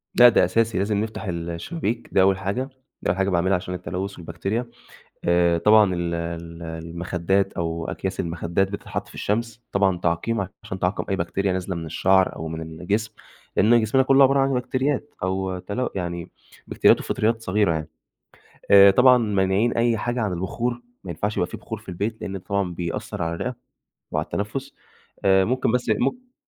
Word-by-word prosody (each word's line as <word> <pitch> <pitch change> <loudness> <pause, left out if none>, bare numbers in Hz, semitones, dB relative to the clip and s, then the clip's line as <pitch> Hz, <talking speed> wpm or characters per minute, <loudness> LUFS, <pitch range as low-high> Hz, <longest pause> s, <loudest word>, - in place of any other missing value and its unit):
لأ 120 0 +9
ده 115 - +4
أساسي 115 -2 +1
لازم 100 +2 0
نفتح 110 +1 -3
ال 85 -3 -4
الشبابيك 115 - -3
ده 95 - +4
أول 95 0 +4
حاجة 100 +8 -2 0.3
ده - - -1
أول 90 - -2
حاجة 95 0 +1
باعملها 95 +1 +2
عشان 90 0 -4
التلوث 95 +2 -4
والبكتيريا، 95 +8 -3 0.6
آآ 85 -1 +3
طبعًا 105 0 +5
ال 85 -1 -2
ال 85 0 -5
المخدات 85 +3 -2
أو 85 0 -3
أكياس 95 0 -4
المخدات 85 +2 0
بتتحط 100 - -5
في - - -16
الشمس 115 +2 -2
طبعًا 95 -2 +2
تعقيم 90 +4 -1 0.2
عشان 95 - -6
تعقم 90 +3 -1
أي 95 - +1
بكتيريا 95 +2 -1
نازلة 95 0 -3
من 85 -1 -5
الشعر 95 +4 +2
أو 80 - -5
من 80 0 -5
الجسم، 90 +7 -2 0.5
لإن 115 +3 +5
جسمنا 125 +5 +3
كله 135 +1 +5
عبارة 135 +1 +4
عن 135 0 +2
بكتريات 130 +3 -1
أو 95 0 -1
تلو 120 +7 -3
يعني 85 -2 -4 0.4
بكتيريات - - +4
وفطريات 115 +1 0
صغيرة 100 -4 +1
يعني، 80 -1 -4 0.8
آآ 100 0 +9
طبعًا 125 +5 +6
مانعين 105 0 +1
أي 115 -1 +2
حاجة 120 +2 -2
عن 105 -4 0
البخور 120 +7 -3 0.2
ما 90 - -6
ينفعش 100 +6 -2
يبقى 90 - +1
فيه - - -8
بخور - - -6
في - - -21
البيت، 105 +5 -3
لإن 95 - -5
ده 95 - -4
طبعًا 95 -2 -2
بيأثر 85 +3 -4
على 85 0 -1
الرئة 125 +9 -3 0.6
وعلى - - -1
التنفس 135 +7 -4 0.5
آآ 95 -1 +5
ممكن 130 -1 +1
بس 125 0 0
مم 250 - -1
95 Hz, 180 wpm, -23 LUFS, 85-115 Hz, 0.8 s, لأ